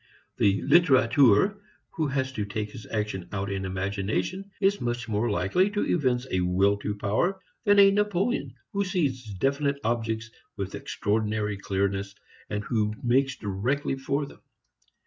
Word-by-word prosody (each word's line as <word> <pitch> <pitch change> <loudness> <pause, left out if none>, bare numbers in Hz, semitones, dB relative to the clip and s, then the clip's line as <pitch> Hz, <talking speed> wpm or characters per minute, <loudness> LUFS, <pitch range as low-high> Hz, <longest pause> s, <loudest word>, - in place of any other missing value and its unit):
The 100 0 +2
literateur 135 - +5 0.3
who 155 -2 -1
has 130 -1 -1
to 110 -5 -3
take 105 +1 -4
his 110 - -10
action 105 -5 -3
out 100 -1 -3
in 95 -1 -2
imagination 100 - -2
is 200 +1 +2
much 120 0 -2
more 110 +2 0
likely 135 - +2
to 205 0 -1
evince 130 -5 +1
a 95 - +1
will 95 +3 +3
to 100 0 -3
power 110 - 0 0.3
than 205 -1 +5
a 200 0 +8
Napoleon 205 - 0 0.2
who 200 - 0
sees 135 - -1
definite 140 +6 0
objects 115 -1 -1 0.3
with 100 -1 -4
extraordinary 105 0 -1
clearness 100 0 -2 0.3
and 105 0 -2
who 105 -1 0
makes 130 +2 +2
directly 120 +8 -1
for 140 +2 -1
them. - - -14
115 Hz, 145 wpm, -27 LUFS, 100-140 Hz, 0.3 s, a